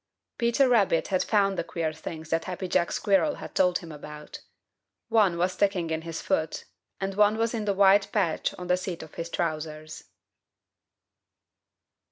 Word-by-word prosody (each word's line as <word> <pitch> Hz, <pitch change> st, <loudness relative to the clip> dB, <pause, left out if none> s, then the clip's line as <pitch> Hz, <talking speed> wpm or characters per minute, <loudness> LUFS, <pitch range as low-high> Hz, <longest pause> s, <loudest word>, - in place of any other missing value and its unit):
Peter 235 Hz, +3 st, +3 dB
Rabbit 205 Hz, -9 st, +2 dB
had 185 Hz, -2 st, +1 dB
found 195 Hz, -3 st, +2 dB
the -, -, 0 dB
queer 165 Hz, -2 st, -3 dB
things 160 Hz, 0 st, -8 dB
that 165 Hz, 0 st, 0 dB
Happy 185 Hz, 0 st, -4 dB
Jack 175 Hz, -1 st, +1 dB
Squirrel 205 Hz, +9 st, +2 dB
had -, -, -9 dB
told 180 Hz, -1 st, +3 dB
him 170 Hz, -2 st, -10 dB
about. 150 Hz, 0 st, -9 dB, 0.7 s
One 210 Hz, -7 st, +3 dB
was 180 Hz, +2 st, +1 dB
sticking 185 Hz, -5 st, 0 dB
in 160 Hz, 0 st, -1 dB
his 165 Hz, 0 st, -6 dB
foot, 160 Hz, 0 st, -1 dB, 0.3 s
and 195 Hz, 0 st, -2 dB
one 210 Hz, +2 st, +3 dB
was 230 Hz, +1 st, 0 dB
in 220 Hz, -3 st, -2 dB
the 200 Hz, -1 st, 0 dB
white 195 Hz, 0 st, +5 dB
patch 190 Hz, -7 st, 0 dB
on 180 Hz, -, -7 dB
the 180 Hz, 0 st, +2 dB
seat 185 Hz, -3 st, -5 dB
of 160 Hz, -, -13 dB
his 165 Hz, 0 st, -5 dB
trousers. 155 Hz, -2 st, -4 dB
180 Hz, 170 wpm, -27 LUFS, 160-200 Hz, 0.7 s, white